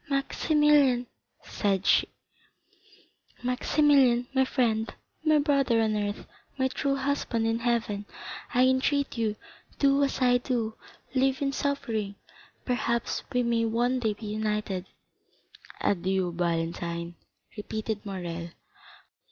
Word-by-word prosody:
"Maximilian," 280 -2 +3 0.4
said 195 -2 -1
she, - - +4 1.4
"Maximilian, 250 -1 +3
my 265 -1 +4
friend, 230 -4 0 0.3
my 310 -1 +4
brother 280 -5 +2
on 220 -1 +1
earth, 205 0 -2 0.3
my 260 -1 +2
true 275 +1 -1
husband 270 -4 -1
in 225 0 +1
heaven, 230 -4 -1 0.4
I 250 +1 +4
entreat 270 +2 +1
you, 220 -3 0 0.4
do 280 0 +4
as 275 - -1
I 245 -1 +4
do, 235 -3 -1 0.4
live 265 0 +2
in 275 - +1
suffering; 230 -8 -2 0.5
perhaps 235 -2 -1
we 250 0 +1
may 235 -1 +1
one 240 +3 +1
day 220 -3 0
be 220 - -10
united." 210 -3 -2 0.9
"Adieu, 190 -1 +1
Valentine," 170 0 -2 0.4
repeated 215 0 -4
Morrel. 175 -4 -5
235 Hz, 110 wpm, -28 LUFS, 210-265 Hz, 1.4 s, she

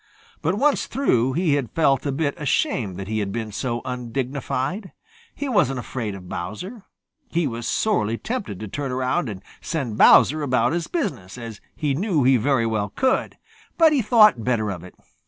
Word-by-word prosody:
But 165 +5 +1
once 285 +4 +2
through, 130 - +1
he 170 -1 +1
had 140 -5 0
felt 140 -4 +2
a - - 0
bit 145 +1 -1
ashamed 110 -9 0
that 95 -1 -6
he 110 +1 -1
had 100 -2 -2
been 110 0 -4
so 120 +2 -3
undignified. 130 - -3 0.4
He 285 - -4
wasn't 170 - +2
afraid 115 -4 -4
of 90 -2 -11
Bowser. 180 - -6 0.4
He 170 -1 0
was 120 -3 -4
sorely 115 - +1
tempted 210 - -4
to 110 - -5
turn 135 +6 -4
around 130 +3 0
and 100 -2 -7 0.2
send 130 -10 -3
Bowser 155 +2 +6
about 135 +2 +1
his 170 -1 -2
business, 125 - -3
as 115 -3 -8
he 150 -3 -1
knew 165 - +1
he 130 +1 +5
very 120 0 +1
well 110 -3 -1
could. 260 - 0 0.4
But 320 -2 +6
he 280 - +3
thought 215 - +5
better 110 -4 0
of 90 -3 -7
it. 90 - -13
130 Hz, 180 wpm, -23 LUFS, 110-170 Hz, 0.4 s, Bowser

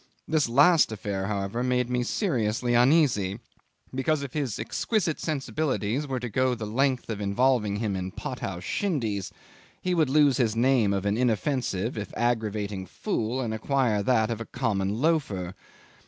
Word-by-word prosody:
This 155 -5 +1
last 145 +4 +5
affair, 100 -3 -3
however, 100 +2 -2
made 125 -1 +1
me 125 0 0
seriously 120 - 0
uneasy, 120 - +3 0.5
because 140 +3 0
if 140 - -7
his 140 -8 -2
exquisite 165 - -1
sensibilities 145 -4 -1
were 130 -2 -2
to 125 - -4
go 130 +3 +1
the 110 - -5
length 130 +4 0
of 105 -2 -4
involving 105 +1 +2
him 105 -2 -1
in 95 0 -3
pot 125 +6 -6
house 90 -2 -5
shindies, 110 - -2 0.5
he 185 - -1
would 160 -5 +2
lose 145 -2 +4
his 115 -4 +1
name 120 -3 +3
of 100 0 -1
an 100 +1 +1
inoffensive, 120 -3 0
if 105 - -6
aggravating, 105 -5 -1
fool, 125 - -2
and 115 -3 -2
acquire 115 -2 +1
that 110 +1 +2
of 115 -1 -3
a - - -4
common 105 -4 -1
loafer. 125 - 0
120 Hz, 160 wpm, -27 LUFS, 105-135 Hz, 0.5 s, last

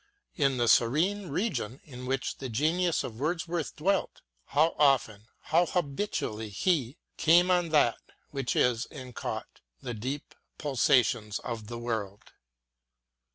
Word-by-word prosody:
In 135 -4 +2
the 120 -1 +1
serene 170 - +3
region 140 - -2
in 125 -3 -9
which 135 0 -2
the 130 - -5
genius 160 +8 +1
of 110 -1 -7
Wordsworth 165 +1 -2
dwelt, 195 +5 0 0.2
how 155 +4 +2
often, 115 -7 +2
how 170 +2 +2
habitually 140 - -2
he 135 - 0 0.2
Came 175 +3 +5
on 175 -2 +2
that 145 -7 +3 0.3
which 135 -4 -2
is 125 -1 +2
and 130 -4 -10
caught - - -5 0.2
The 120 - -4
deep 130 +7 -5 0.2
pulsations 125 -6 +2
of 110 -3 -5
the 120 +1 -6
world. 110 -4 -4
135 Hz, 130 wpm, -29 LUFS, 120-165 Hz, 0.3 s, Came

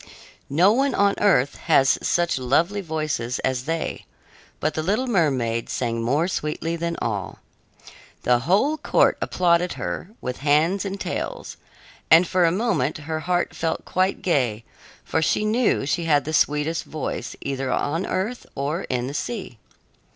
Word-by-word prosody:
No 175 +8 +5
one 270 +3 +1
on 200 0 +3
earth 145 -10 +3
has 135 -4 +5
such 175 -5 +1
lovely 165 +11 +1
voices 155 -8 -2
as 130 -1 -1
they, 165 +1 -3 0.5
but 155 - 0
the 155 - -2
little 210 +10 0
mermaid 135 - 0
sang 115 -2 -2
more 140 +9 +1
sweetly 165 -1 -2
than 170 0 -3
all. 100 -4 -3 0.9
The 120 -1 +3
whole 205 - +2
court - - +3
applauded 175 0 +2
her 85 - -5
with 125 - -4
hands 155 +8 +2
and 195 0 -4
tails, - - -4 0.5
and 165 +2 +7
for 180 0 +3
a 165 - +3
moment 180 - 0
her 155 +1 -4
heart 175 +2 -1
felt 165 -1 -2
quite 185 +1 0
gay, 125 - +1 0.4
for 160 - -1
she 210 +6 +1
knew 220 - +2
she 165 +4 -1
had 145 -3 +3
the 155 - -4
sweetest 150 +2 +1
voice 155 -3 -5
either 135 -1 -2
on 165 +8 -1
earth 210 +7 -3
or 145 +6 -2
in 125 -1 -1
the 135 - -5
sea. 165 - -5
160 Hz, 155 wpm, -23 LUFS, 135-185 Hz, 0.9 s, and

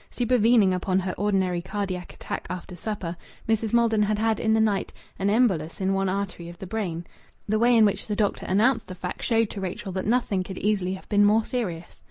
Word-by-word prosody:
Supervening 230 -4 +3
upon 185 +1 0
her 185 0 -3
ordinary 190 -3 0
cardiac 185 -1 -4
attack - - -6
after 180 0 -6
supper, 180 -2 -4 0.3
Mrs. 225 -1 +1
Maldon 230 -2 +3
had 210 0 +1
had, 220 -1 +1
in 220 - +1
the - - +3
night, 210 -3 +1 0.3
an 195 +1 +1
embolus 195 -9 +1
in 190 0 +1
one 195 0 +1
artery 185 -3 -3
of 175 - -11
the 190 - -8
brain. 180 -5 -3 0.4
The 215 +1 +1
way 240 +1 +5
in 220 - +7
which 200 - -1
the 210 - -1
doctor 205 -1 -1
announced 225 +7 +2
the 185 - -7
fact 180 0 -6
showed 225 -2 +1
to 200 - -6
Rachel 190 +1 -4
that 190 +1 -3
nothing 220 -5 +1
could 185 0 -7
easily 195 -3 0
have 190 - -13
been 205 -1 +3
more 215 +2 +4
serious. 180 -9 -4
200 Hz, 215 wpm, -25 LUFS, 185-220 Hz, 0.4 s, in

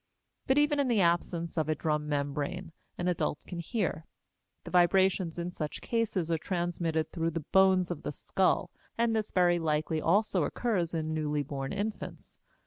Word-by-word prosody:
But 265 - +3
even 295 0 +3
in 280 - +2
the 235 -4 +2
absence 170 -1 0
of 155 -1 -1
a 155 - +2
drum 150 -1 -1
membrane 145 +5 -2 0.3
an 175 - -2
adult 175 -4 -1
can 175 - -6
hear; 170 -3 -2 0.6
the - - -9
vibrations 185 -1 +3
in 175 +1 -3
such 155 -4 -4
cases 210 -8 -1
are 165 - +1
transmitted 170 -3 -1
through 165 -1 -1
the 165 -2 -4
bones 190 -2 +4
of 170 - -4
the - - -3
skull, 185 +5 0 0.3
and 230 -1 +2
this 215 -1 -1
very 175 -1 +3
likely 155 0 0
also 190 0 +2
occurs 180 -4 -1
in 155 -1 -2
newly 150 -2 -1
born 135 -1 -4
infants. 205 +2 -5
170 Hz, 170 wpm, -30 LUFS, 155-190 Hz, 0.6 s, bones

